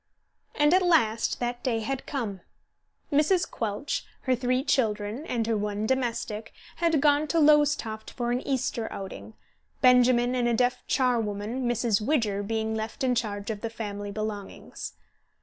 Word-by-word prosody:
And 295 Hz, +2 st, +4 dB
at 370 Hz, -, +5 dB
last 230 Hz, -11 st, +2 dB
that 245 Hz, 0 st, -2 dB
day 230 Hz, -3 st, 0 dB
had 265 Hz, +4 st, -4 dB
come. 220 Hz, -10 st, -3 dB, 0.7 s
Mrs. 310 Hz, +5 st, +3 dB
Quelch, 225 Hz, +7 st, -3 dB, 0.2 s
her 260 Hz, -, +1 dB
three 255 Hz, +1 st, 0 dB
children 225 Hz, 0 st, 0 dB
and 230 Hz, -2 st, -1 dB
her 225 Hz, 0 st, +1 dB
one 210 Hz, 0 st, -2 dB
domestic, 230 Hz, -3 st, -2 dB, 0.2 s
had 330 Hz, -3 st, +2 dB
gone 295 Hz, +1 st, +3 dB
to 330 Hz, +3 st, +1 dB
Lowestoft 295 Hz, -8 st, +3 dB
for 240 Hz, -1 st, -3 dB
an 245 Hz, +1 st, 0 dB
Easter 250 Hz, -4 st, -2 dB
outing, 195 Hz, +2 st, -8 dB, 0.5 s
Benjamin 250 Hz, -1 st, +5 dB
and 245 Hz, -1 st, +1 dB
a 235 Hz, -, +2 dB
deaf 245 Hz, +1 st, +1 dB
charwoman, 235 Hz, -1 st, 0 dB
Mrs. 235 Hz, -3 st, +1 dB
Widger, 215 Hz, -6 st, +1 dB
being 220 Hz, +1 st, -2 dB
left 220 Hz, +3 st, -4 dB
in 255 Hz, -1 st, +3 dB
charge 210 Hz, -3 st, -2 dB
of 210 Hz, -2 st, -6 dB
the 230 Hz, -, -3 dB
family 205 Hz, -3 st, -5 dB
belongings. 210 Hz, -1 st, -6 dB
240 Hz, 150 wpm, -27 LUFS, 215-265 Hz, 0.7 s, at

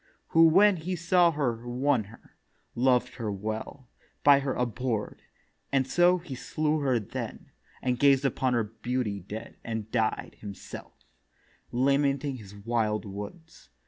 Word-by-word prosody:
Who 165 Hz, 0 st, +6 dB
when 195 Hz, +4 st, +5 dB
he 180 Hz, +3 st, -3 dB
saw 175 Hz, +1 st, +4 dB
her 140 Hz, -7 st, 0 dB
won 125 Hz, -2 st, +1 dB
her; 110 Hz, +4 st, -17 dB, 0.4 s
loved 125 Hz, -1 st, +2 dB
her 110 Hz, -4 st, -2 dB
well; 110 Hz, +6 st, -5 dB, 0.4 s
By 140 Hz, -1 st, +7 dB
her 135 Hz, -1 st, -2 dB
abhor'd: 120 Hz, -2 st, -2 dB, 0.5 s
and 135 Hz, -1 st, +2 dB
so 175 Hz, +6 st, +4 dB
he 165 Hz, -5 st, -8 dB
slew 155 Hz, +4 st, -1 dB
her 135 Hz, -4 st, +2 dB
then, 105 Hz, -, -6 dB, 0.3 s
And 125 Hz, -1 st, 0 dB
gazed 140 Hz, -1 st, +5 dB
upon 130 Hz, -1 st, +1 dB
her 115 Hz, -, +2 dB
beauty 110 Hz, 0 st, -3 dB
dead, 105 Hz, +5 st, -8 dB
and 110 Hz, -2 st, -4 dB
died 110 Hz, -2 st, -1 dB
Himself, 100 Hz, -2 st, -10 dB, 0.7 s
lamenting 140 Hz, +1 st, +1 dB
his 105 Hz, -3 st, -12 dB
wild 110 Hz, 0 st, -1 dB
woods. 105 Hz, -, -9 dB
125 Hz, 140 wpm, -28 LUFS, 110-145 Hz, 0.7 s, By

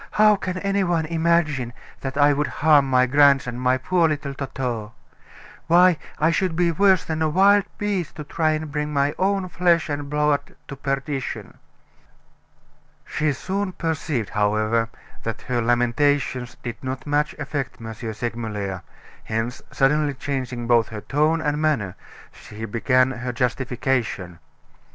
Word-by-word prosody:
"How 210 Hz, 0 st, +6 dB
can 185 Hz, -2 st, -4 dB
any 200 Hz, +1 st, 0 dB
one 170 Hz, -3 st, +1 dB
imagine 160 Hz, -6 st, +1 dB, 0.3 s
that 135 Hz, 0 st, -5 dB
I 145 Hz, 0 st, +5 dB
would 145 Hz, +1 st, 0 dB
harm 145 Hz, -3 st, +3 dB
my 130 Hz, -1 st, +4 dB
grandson, 135 Hz, -2 st, +3 dB
my 130 Hz, 0 st, +2 dB
poor 170 Hz, +4 st, +2 dB
little 145 Hz, -2 st, -3 dB
Toto! 125 Hz, -5 st, -4 dB, 0.7 s
Why, 175 Hz, 0 st, +5 dB, 0.2 s
I 160 Hz, +2 st, +3 dB
should 175 Hz, 0 st, 0 dB
be 175 Hz, 0 st, +2 dB
worse 190 Hz, +2 st, +3 dB
than 160 Hz, 0 st, -3 dB
a 160 Hz, -, +2 dB
wild 195 Hz, +4 st, +5 dB
beast 200 Hz, -6 st, -2 dB
to 150 Hz, -, -6 dB
try 155 Hz, +2 st, 0 dB
and 155 Hz, -1 st, -4 dB
bring 150 Hz, 0 st, -2 dB
my 140 Hz, 0 st, +1 dB
own 195 Hz, 0 st, +1 dB
flesh 170 Hz, -2 st, +2 dB
and 145 Hz, -1 st, -3 dB
blood 150 Hz, -1 st, 0 dB
to 140 Hz, -, -5 dB
perdition." 135 Hz, 0 st, -4 dB, 1.5 s
She 155 Hz, 0 st, 0 dB
soon 190 Hz, +7 st, -3 dB
perceived, 155 Hz, -, -2 dB
however, 110 Hz, +2 st, +1 dB, 0.3 s
that 115 Hz, -1 st, -5 dB
her 120 Hz, -1 st, -1 dB
lamentations 120 Hz, +2 st, +1 dB
did 120 Hz, +1 st, -6 dB
not 130 Hz, 0 st, -4 dB
much 150 Hz, 0 st, 0 dB
affect 145 Hz, -3 st, -4 dB
M. 110 Hz, -1 st, -7 dB
Segmuller, 110 Hz, -4 st, -4 dB, 0.4 s
hence, 115 Hz, +2 st, -3 dB
suddenly 145 Hz, +1 st, +2 dB
changing 130 Hz, -3 st, -4 dB
both 115 Hz, -1 st, +3 dB
her 105 Hz, -1 st, -7 dB
tone 155 Hz, +6 st, +1 dB
and 150 Hz, -1 st, -1 dB
manner, 130 Hz, -, 0 dB, 0.4 s
she 110 Hz, +2 st, -9 dB
began 130 Hz, +4 st, +2 dB
her 125 Hz, -1 st, -4 dB
justification. 125 Hz, -7 st, -1 dB
140 Hz, 145 wpm, -23 LUFS, 120-160 Hz, 1.5 s, How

